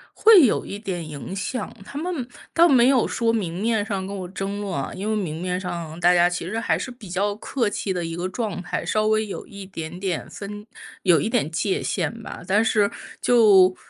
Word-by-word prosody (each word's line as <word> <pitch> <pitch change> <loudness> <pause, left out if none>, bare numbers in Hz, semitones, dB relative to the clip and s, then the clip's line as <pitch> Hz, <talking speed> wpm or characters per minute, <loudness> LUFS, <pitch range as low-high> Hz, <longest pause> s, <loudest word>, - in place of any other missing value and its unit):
会 425 -8 +8
有 225 - +1
一 200 - -6
点 180 -6 -4
影 155 +5 -7
响， 205 +4 -3
他 280 - -8
们 315 -6 -3 0.3
倒 340 +1 +6
没 255 -4 +5
有 265 -3 +4
说 230 -1 +1
明 185 -5 -2
面 220 -2 +1
上 195 -4 -3
跟 200 - -5
我 185 -2 -5
争 195 +2 -4
论 195 -2 -4
啊， 135 -3 -3
因 200 +3 -4
为 220 - +1
明 170 -6 -3
面 180 0 -1
上 170 -3 -5
大 175 +1 +5
家 175 0 +5
其 180 -1 -4
实 220 +5 -2
还 - - +1
是 255 - -5
比 240 -6 -12
较 200 +3 0
客 230 +1 -1
气 195 -1 -2
的 175 - -2
一 165 - -4
个 175 +2 -2
状 210 -1 -3
态， 175 - -3
稍 215 0 +1
微 215 0 +2
有 205 - -6
一 200 -1 -9
点 175 -2 -7
点 190 -3 -3
分 205 +1 -8 0.4
有 175 -4 +5
一 220 - -1
点 230 - +1
界 190 +4 -1
限 230 - -2
吧。 - - -8
但 205 +3 +3
是 210 -2 +3 0.3
就 200 -6 +6
200 Hz, 240 characters per minute, -23 LUFS, 180-225 Hz, 0.4 s, 会